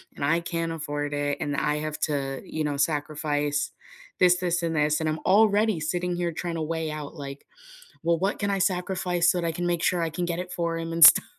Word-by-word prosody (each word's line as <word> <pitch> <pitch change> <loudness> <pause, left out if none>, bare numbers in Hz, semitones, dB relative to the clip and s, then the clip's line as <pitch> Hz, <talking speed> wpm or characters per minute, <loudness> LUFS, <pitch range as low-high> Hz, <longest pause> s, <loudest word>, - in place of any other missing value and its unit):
and 140 - -2
I 165 +4 +2
can't 165 -1 -3
afford 145 -2 -4
it, 145 0 -1
and 145 -1 -2
I 150 +1 0
have 155 0 -4
to, 135 -2 -3
you 155 -1 -3
know, 145 -1 -1
sacrifice 145 0 -1 0.5
this, 180 -1 +6
this 175 -1 0
and 165 -1 -1
this, 150 0 +2
and 160 - -1
I'm 155 +1 -2
already 210 -1 +4
sitting 175 +3 -2
here 175 -1 -1
trying 170 +1 -4
to 165 - -3
weigh 160 0 -2
out, 150 0 -7
like, 140 -2 -8 0.6
well, 170 0 +2
what 195 +4 -1
can 200 - -1
I 195 -1 0
sacrifice 180 -2 +1
so 180 - 0
that - - -1
I 165 - 0
can 175 +2 -3
make 175 -1 0
sure 180 - +2
I 165 - 0
can 175 +3 -3
get 170 -1 -2
it 180 0 -5
for 170 -1 -2
him 165 0 -4
and 165 -1 +8
stuff. - - +9
165 Hz, 235 wpm, -26 LUFS, 150-175 Hz, 0.6 s, stuff